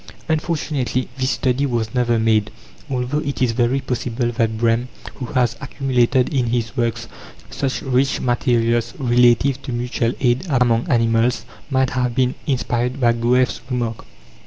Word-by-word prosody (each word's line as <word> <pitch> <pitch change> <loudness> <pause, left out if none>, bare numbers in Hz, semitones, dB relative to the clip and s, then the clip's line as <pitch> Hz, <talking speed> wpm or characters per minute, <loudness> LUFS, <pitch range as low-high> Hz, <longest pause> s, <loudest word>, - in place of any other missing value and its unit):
Unfortunately, 150 -5 -1
this 130 0 0
study 130 +3 0
was 115 -3 -2
never 120 -2 +2
made, 110 -1 +2 0.4
although 130 +2 -1
it 140 -2 -4
is 125 -3 +2
very 120 +3 +1
possible 120 -1 -2
that 115 -2 0
Brehm, 115 +2 +1 0.3
who 125 - -5
has 125 -2 +1
accumulated 130 -1 +1
in 125 -3 +1
his 115 0 -1
works 120 -4 -1 0.4
such 135 -2 -2
rich 135 +1 +1
materials 120 0 +1
relative 125 0 +3
to 135 - -6
mutual 120 -1 -1
aid 130 +7 +1
among 120 -4 +2
animals, 115 0 +2 0.2
might 130 -2 +1
have 125 -2 -1
been 130 -1 +2
inspired 125 -1 -1
by 120 -2 +4
Goethe's 125 +2 +1
remark. 120 -3 -3
125 Hz, 145 wpm, -20 LUFS, 120-130 Hz, 0.4 s, by